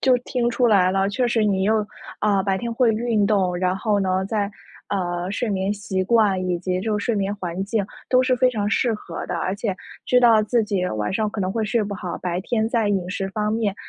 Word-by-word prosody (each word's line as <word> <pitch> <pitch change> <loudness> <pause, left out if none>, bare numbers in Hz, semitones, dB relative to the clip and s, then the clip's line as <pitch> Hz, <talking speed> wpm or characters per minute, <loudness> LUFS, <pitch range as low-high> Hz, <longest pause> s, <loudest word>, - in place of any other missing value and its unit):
就 260 -2 +4
听 245 -1 -1
出 245 +1 +2
来 195 -5 +4
了， 195 +1 +1
确 245 +5 0
实 235 -2 +1
你 195 -2 +1
又 215 0 +2 0.3
啊， 200 -2 +2
白 195 0 0
天 235 +1 -3
会 235 0 +3
运 220 -2 +1
动， 190 -4 +1
然 185 +1 0
后 205 0 0
呢， 190 0 0
在， 205 -1 -1 0.4
呃， 175 -2 -2
睡 225 +3 -2
眠 195 0 0
习 190 -2 -2
惯 205 -3 +3
以 180 -1 0
及 180 +1 -2
就 210 +1 -1
是 - - -4
睡 235 - +1
眠 200 0 -1
环 180 0 -4
境 205 0 -1 0.3
都 255 0 +5
是 255 -1 +2
非 255 +1 +3
常 210 -4 -1
适 230 +2 +1
合 170 -5 -7
的， - - -3
而 185 - -1
且 205 -3 -2 0.3
知 250 - +4
道 230 -3 +6
自 230 +2 +1
己 195 -3 -1
晚 105 - -2
上 215 +2 0
可 215 - -5
能 185 -1 -1
会 225 0 -1
睡 215 +2 +1
不 205 0 -4
好， 185 -3 -5
白 180 -1 -2
天 220 +1 0
在 230 -3 +1
饮 190 -3 0
食 195 0 -3
方 210 +1 -1
面 220 -3 0
205 Hz, 260 characters per minute, -22 LUFS, 190-225 Hz, 0.4 s, 道